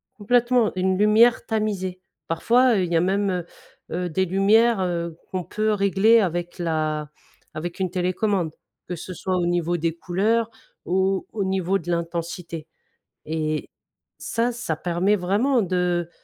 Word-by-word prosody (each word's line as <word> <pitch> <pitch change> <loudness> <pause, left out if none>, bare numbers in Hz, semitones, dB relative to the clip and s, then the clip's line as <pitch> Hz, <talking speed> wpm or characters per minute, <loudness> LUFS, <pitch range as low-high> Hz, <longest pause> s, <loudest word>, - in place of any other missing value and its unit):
Complètement. 240 +1 +2
Une 185 0 +1
lumière 215 +3 +4
tamisée. 195 -4 -2 0.3
Parfois, 240 +9 +3
heu, 190 - +2
il 175 - -3
y - - +2
a 165 - +3
même, 195 +2 +1
heu 180 -2 -2 0.6
heu, - - -3
des 190 +4 +1
lumières, 200 +4 +3
heu, 170 -2 -2 0.2
qu'on 185 -1 -2
peut 215 +3 -1
régler 200 +3 +4
avec 175 -1 -2
la 155 -3 -1 0.4
avec 170 +4 -5
une 185 - 0
télécommande, 185 -1 0 0.4
que 175 - -3
ce 180 +3 -7
soit 185 +2 -2
au 175 - 0
niveau 175 0 0
des 165 0 -1
couleurs 215 +7 0 0.4
ou 190 +1 +1
au 210 -3 -2
niveau 190 0 0
de 170 - -9
l'intensité 170 -1 -4 0.6
et 155 -1 -2 0.5
ça, 235 +2 -1
ça 235 -9 -3
permet 175 +5 +1
vraiment 210 +8 +1
de 180 -2 0
185 Hz, 150 wpm, -23 LUFS, 170-210 Hz, 0.6 s, lumière